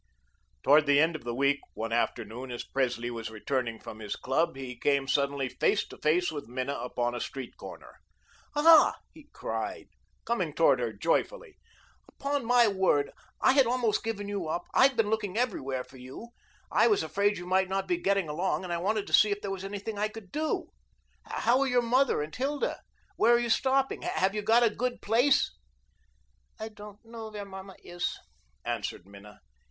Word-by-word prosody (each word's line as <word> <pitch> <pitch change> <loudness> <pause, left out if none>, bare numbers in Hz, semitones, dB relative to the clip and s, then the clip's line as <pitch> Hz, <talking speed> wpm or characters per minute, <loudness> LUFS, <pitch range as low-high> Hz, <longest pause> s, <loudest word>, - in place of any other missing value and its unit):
Towards 150 +1 +5
the 145 0 +5
end 160 +2 +3
of 145 - -8
the 120 -1 -3
week, 140 +2 +2 0.2
one 115 +1 -4
afternoon, 120 +2 -2
as 120 - -5
Presley 120 -3 -1
was 115 -2 -5
returning 115 +1 -3
from 110 - -9
his 105 -2 -4
club, 135 +4 0
he 130 -2 -7
came 140 +2 +1
suddenly 140 -1 +1
face 125 - +1
to - - -11
face 170 +3 +2
with 145 -5 -6
Minna 130 +3 -3
upon 120 0 -2
a 120 - -3
street 135 -3 -6
corner. - - -11 0.6
"Ah," 315 +1 +7 0.2
he 305 -2 -16
cried, - - -5 0.4
coming 185 -10 -1
toward 140 -6 +4
her 120 -2 -1
joyfully. 395 - -1 0.5
"Upon 280 -1 -2
my 240 0 +5
word, 190 -8 +2 0.3
I - - +6
had 270 -3 +5
almost 240 -3 +1
given 205 -3 -3
you 200 -5 -3
up. 170 +3 -2
I've 265 0 +5
been 220 -2 +2
looking 210 -2 -1
everywhere 135 - -1
for 130 - -16
you. 130 - -10 0.4
I - - +4
was 410 -2 +3
afraid 205 +1 +1
you 180 - -7
might 185 +1 +2
not 195 0 -1
be 175 -2 +1
getting 195 0 +1
along, 175 +6 -1
and 175 -2 -4
I 170 - -1
wanted 205 +3 0
to - - -10
see 215 - +7
if 205 0 -2
there 200 - -4
was 195 -1 -5
anything 205 +2 -5
I 210 - +2
could 215 -3 -11
do. 310 +1 -2 0.5
How 245 +2 +1
are 275 - +2
your 250 -1 +2
mother 250 - +2
and 155 +1 -8
Hilda? 280 +2 -2 0.4
Where 235 +2 +5
are - - +3
you 240 -1 -1
stopping? 270 +2 +1
Have 190 +1 0
you 210 - -2
got 230 +3 +4
a 230 - +4
good 250 +1 -2
place?" 245 +6 +3 1.0
"I 220 +1 -5
don't 210 0 -13
know 225 -1 -8
where 210 -1 -7
mamma 190 -1 -10
is," 175 0 -3 0.5
answered 85 - -3
Minna. 100 +1 -14
190 Hz, 190 wpm, -29 LUFS, 135-225 Hz, 1.0 s, Ah